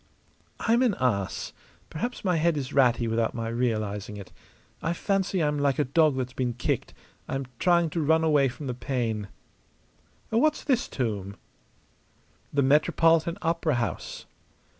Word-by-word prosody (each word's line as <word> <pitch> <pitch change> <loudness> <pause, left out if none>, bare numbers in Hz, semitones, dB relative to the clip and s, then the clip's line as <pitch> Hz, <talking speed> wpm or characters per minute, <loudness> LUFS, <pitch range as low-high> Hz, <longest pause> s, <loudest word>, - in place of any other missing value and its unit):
"I'm 235 +2 +2
an 240 -7 +3
ass. 100 -7 -1 0.4
Perhaps 240 +8 -4
my 180 -3 +2
head 165 0 +2
is 135 -3 -4
ratty 120 -3 +3
without 115 0 0
my 115 -1 -3
realizing 110 -4 -2
it. 100 -2 -10 0.5
I 165 - 0
fancy 190 -1 0
I'm 150 -1 0
like 140 -1 +1
a 150 - +3
dog 145 +1 +3
that's 130 -1 -3
been 125 -2 -1
kicked; 120 - -2 0.3
I'm 135 0 -3
trying 170 -3 +3
to 165 - -1
run 160 +2 +3
away 150 -4 +4
from 135 +4 -8
the 125 - -2
pain. 120 -5 -2 1.0
What's 300 +7 +2
this 255 -5 +1
tomb?" 100 -6 -3 1.2
"The 140 -1 +2
Metropolitan 165 +4 +3
Opera 165 -2 +1
House." 115 -8 -3
140 Hz, 145 wpm, -27 LUFS, 120-165 Hz, 1.2 s, away